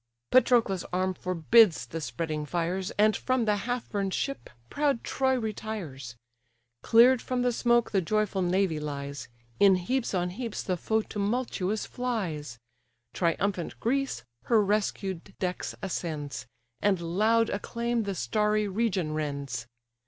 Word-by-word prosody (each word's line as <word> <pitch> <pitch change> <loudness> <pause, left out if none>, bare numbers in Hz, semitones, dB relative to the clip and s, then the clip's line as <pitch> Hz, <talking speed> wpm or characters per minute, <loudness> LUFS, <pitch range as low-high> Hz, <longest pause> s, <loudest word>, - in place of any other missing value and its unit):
Patroclus' 235 -7 +4
arm 185 +1 0
forbids 185 +3 +4
the 165 - -6
spreading 150 +4 -3
fires, 175 +4 -2
And 215 +1 +4
from 255 -2 0
the 210 -1 +3
half 245 +4 -3
burn'd 195 -2 -1
ship 275 0 -3 0.2
proud 285 - 0
Troy 265 -1 +1
retires; 200 - -5 0.7
Clear'd 240 +2 +6
from 250 -1 -1
the 250 - +2
smoke 240 0 +2
the 195 - +2
joyful 210 +1 0
navy 180 -2 +1
lies; 140 -1 -5 0.3
In 195 -2 +7
heaps 230 +5 -1
on 180 -1 0
heaps 230 +3 -4
the 185 - -1
foe 220 +5 0
tumultuous 210 -1 -2
flies; 175 - -3 0.6
Triumphant 180 +1 -1
Greece 275 +3 -1 0.2
her 230 -2 +4
rescued 195 -3 -2
decks 180 -1 -3
ascends, 150 -8 -4 0.3
And 200 -3 +2
loud 215 +7 +2
acclaim 235 +3 -1
the 200 -2 -3
starry 210 +1 +1
region 190 -6 0
rends. 140 -6 -3
200 Hz, 130 wpm, -28 LUFS, 170-230 Hz, 0.7 s, In